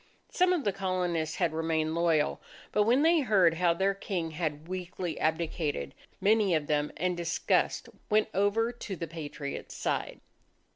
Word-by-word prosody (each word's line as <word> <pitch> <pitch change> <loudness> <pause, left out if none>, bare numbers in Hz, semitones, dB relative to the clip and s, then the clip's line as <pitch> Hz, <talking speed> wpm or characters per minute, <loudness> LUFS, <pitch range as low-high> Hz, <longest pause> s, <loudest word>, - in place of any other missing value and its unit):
Some 365 0 +3
of 350 -5 +1
the 205 - 0
Colonists 180 -4 -1
had 170 -4 0
remained 160 -1 0
loyal, 165 -3 +1 0.3
but 210 - +3
when 250 +6 +4
they 330 +1 +5
heard 195 - +4
how 175 +1 +2
their 195 +3 +2
King 180 -4 -3
had 155 -1 -3
weakly 180 -1 -4
abdicated 155 - -1 0.3
many 210 -3 +3
of 155 -2 0
them, 150 0 0
in 180 0 0
disgust, 170 0 0 0.2
went 215 0 +3
over 205 +4 +2
to 230 -5 -6
the 170 - -4
Patriots' 150 -3 -6
side. - - -2
175 Hz, 155 wpm, -29 LUFS, 160-200 Hz, 0.3 s, they